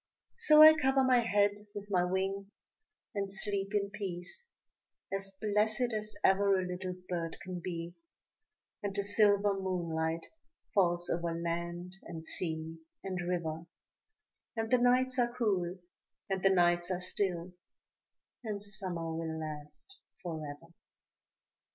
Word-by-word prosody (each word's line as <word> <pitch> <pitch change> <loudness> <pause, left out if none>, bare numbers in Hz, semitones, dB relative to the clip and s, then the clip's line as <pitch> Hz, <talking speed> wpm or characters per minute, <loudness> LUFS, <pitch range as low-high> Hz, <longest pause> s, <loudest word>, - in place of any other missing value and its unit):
So 305 -6 +8
I 315 0 +11
cover 270 -3 +2
my 255 -1 +5
head 205 -2 +1
with 205 0 -7
my 180 -2 +3
wing, 195 +2 -1 0.6
and 200 -2 -2
sleep 195 +1 -1
in 200 -1 0
peace, 200 - -5 0.7
As 195 0 -1
blessed 215 +3 +1
as 215 0 -4
ever 195 0 +4
a 185 - -1
little 180 0 -4
bird 170 -2 -3
can 185 -1 -6
be; 170 -1 -4 0.9
And 200 -2 -3
the 200 - +2
silver 205 0 +4
moonlight 170 -4 -2 0.5
falls 175 -3 +3
over 170 -1 -1
land 170 +2 -4
and 165 -1 -8
sea 160 -1 -3 0.2
and 185 -2 -3
river, 165 -2 -2 0.9
And 225 0 -2
the 250 - +5
nights 255 +1 +3
are 240 0 +1
cool, 190 -6 0 0.5
and 190 -1 0
the 195 - +5
nights 175 -1 +3
are 180 -1 -1
still, 180 -1 0 0.9
and 210 -3 -3
Summer 185 -5 -2
will 160 -1 -3
last 155 - -7 0.2
forever. 160 -1 -6
190 Hz, 130 wpm, -32 LUFS, 170-205 Hz, 0.9 s, I